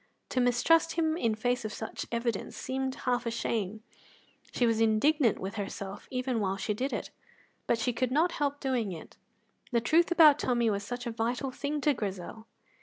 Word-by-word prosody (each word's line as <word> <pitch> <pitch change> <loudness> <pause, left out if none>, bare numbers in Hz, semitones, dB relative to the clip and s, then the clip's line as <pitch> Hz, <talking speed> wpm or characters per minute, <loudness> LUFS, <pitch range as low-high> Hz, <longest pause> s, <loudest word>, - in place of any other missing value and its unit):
To 255 - +1
mistrust 310 +7 +3
him 320 -2 +1
in 230 -10 0
face 245 +2 0
of 215 - -4
such 220 0 -6
evidence 235 -3 -2
seemed 265 0 -2
half 245 -1 +1
a - - +2
shame; 220 -2 -2 0.7
she 245 - +1
was 225 -1 +2
indignant 230 +3 +3
with 195 +3 -5
herself 200 0 -6
even 255 -2 -1
while 195 -2 -1
she 210 - -1
did 260 +6 -2
it; - - -4 0.6
but 235 - +3
she 240 +2 0
could 255 +1 0
not 320 +6 +3
help 285 -2 -1
doing 250 -7 -1
it, 160 - -11 0.5
the 235 - +3
truth 320 +9 +3
about 315 -4 +7
Tommy 240 -3 +2
was 200 -1 -1
such 245 +4 -5
a 235 - -2
vital 240 +4 -2
thing 290 +3 -3
to 295 +1 +3
Grizel. 210 0 -5
240 Hz, 185 wpm, -30 LUFS, 220-270 Hz, 0.7 s, about